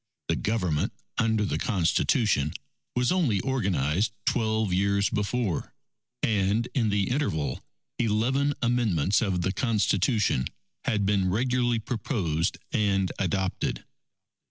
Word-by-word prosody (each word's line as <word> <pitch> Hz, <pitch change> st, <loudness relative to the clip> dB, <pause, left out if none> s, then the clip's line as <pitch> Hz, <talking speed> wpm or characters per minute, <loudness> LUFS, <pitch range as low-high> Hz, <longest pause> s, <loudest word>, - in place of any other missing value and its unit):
The -, -, +3 dB
Government 90 Hz, -9 st, 0 dB, 0.3 s
under 110 Hz, -2 st, +2 dB
the -, -, -1 dB
Constitution, 95 Hz, -, +1 dB, 0.4 s
was 125 Hz, 0 st, +2 dB
only 155 Hz, -, +2 dB
organized 100 Hz, -, 0 dB
twelve 110 Hz, -4 st, +1 dB
years 100 Hz, +2 st, +2 dB
before, 105 Hz, -3 st, -1 dB, 0.5 s
and 105 Hz, +2 st, +1 dB
in 115 Hz, -5 st, +1 dB
the 100 Hz, +1 st, 0 dB
interval 80 Hz, -, -1 dB, 0.4 s
eleven 125 Hz, +6 st, +1 dB
amendments 105 Hz, -7 st, +2 dB
of 95 Hz, -6 st, 0 dB
the 95 Hz, -, +1 dB
Constitution 105 Hz, -, +1 dB, 0.4 s
had 105 Hz, -2 st, +1 dB
been 95 Hz, -2 st, +2 dB
regularly 120 Hz, +3 st, +1 dB
proposed 100 Hz, -, -1 dB, 0.2 s
and 100 Hz, -3 st, +1 dB
adopted. 95 Hz, -1 st, -1 dB
105 Hz, 110 wpm, -27 LUFS, 95-120 Hz, 0.5 s, The